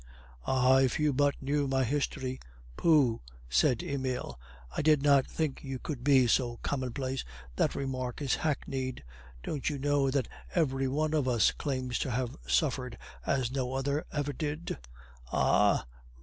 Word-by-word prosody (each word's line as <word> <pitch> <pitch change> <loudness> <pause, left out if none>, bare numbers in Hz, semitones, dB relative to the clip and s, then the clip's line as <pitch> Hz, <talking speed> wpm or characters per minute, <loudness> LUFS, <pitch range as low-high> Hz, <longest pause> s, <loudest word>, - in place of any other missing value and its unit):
"Ah, 130 0 +4
if 130 -2 +2
you 150 -1 +2
but 145 +1 +2
knew 140 +1 +1
my 135 0 +2
history!" 130 0 -2 0.4
"Pooh," 145 - +3 0.3
said - - +2
Emile; 130 - -3 0.4
"I - - 0
did 150 -2 +4
not 140 -2 +5
think 155 -4 -2
you 135 -2 -4
could 130 -1 -6
be 135 -2 +5
so 120 0 +1
commonplace; 130 0 -2 0.3
that - - +1
remark 130 -2 -3
is 140 -3 0
hackneyed. 135 -4 -2 0.4
Don't 145 -1 -2
you 145 - -3
know 140 0 +2
that 130 -3 0 0.3
every 135 -5 +1
one 155 +4 0
of 150 -4 +1
us 120 -3 +4
claims 130 -4 -2
to - - -1
have 125 0 -2
suffered 115 - 0 0.3
as 130 -3 +1
no 130 -1 -2
other 140 +3 0
ever 145 -1 -2
did?" 150 - -4 0.5
"Ah!" - - +3
135 Hz, 150 wpm, -30 LUFS, 130-145 Hz, 0.5 s, not